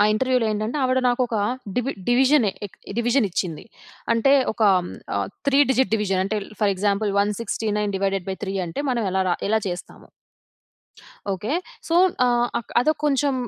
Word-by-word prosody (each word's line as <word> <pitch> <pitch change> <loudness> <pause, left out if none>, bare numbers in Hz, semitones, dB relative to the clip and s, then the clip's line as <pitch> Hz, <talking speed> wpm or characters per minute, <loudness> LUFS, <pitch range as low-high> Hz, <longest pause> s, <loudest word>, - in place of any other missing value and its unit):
ఆ - - +6
ఇంటర్వ్యూలో 255 +1 +1
ఏంటంటే, 215 +6 -2
ఆవిడ 255 0 +2
నాకొక 245 -2 0 0.4
డివి 250 +2 0 0.2
డివిజనే 255 -2 +4
ఇ 200 0 -10
డివిజన్ 240 0 +2
ఇచ్చింది. 170 -3 -3 0.5
అంటే 230 +4 +3 0.2
ఒక 220 - -3
ఆహ్, 180 - +1 0.3
హ్మ్, - - -1 0.2
త్రీ 275 - +3
డిజిట్ 260 -3 +2
డివిజన్ 195 -3 0
అంటే, 215 +2 -1 0.2
ఫర్ 205 -2 +3
ఎగ్జాంపుల్, 200 +1 0
169 210 0 -1
డివైడెడ్ 195 -2 -1
బై 190 - -3
3 195 0 -4
అంటే 165 +12 -4
మనం 235 -3 0
ఎలా 190 - +2
రా - - +2
ఎలా 220 - +3
చేస్తాము? 175 0 -8 1.2
ఓకే. 200 +7 -3 0.4
సో, 330 - 0 0.3
ఆహ్, 240 -1 +2
అక్ 235 - -11
అదో 310 +5 +3
కొంచెం 285 -1 +2
220 Hz, 160 wpm, -23 LUFS, 200-255 Hz, 1.2 s, ఆ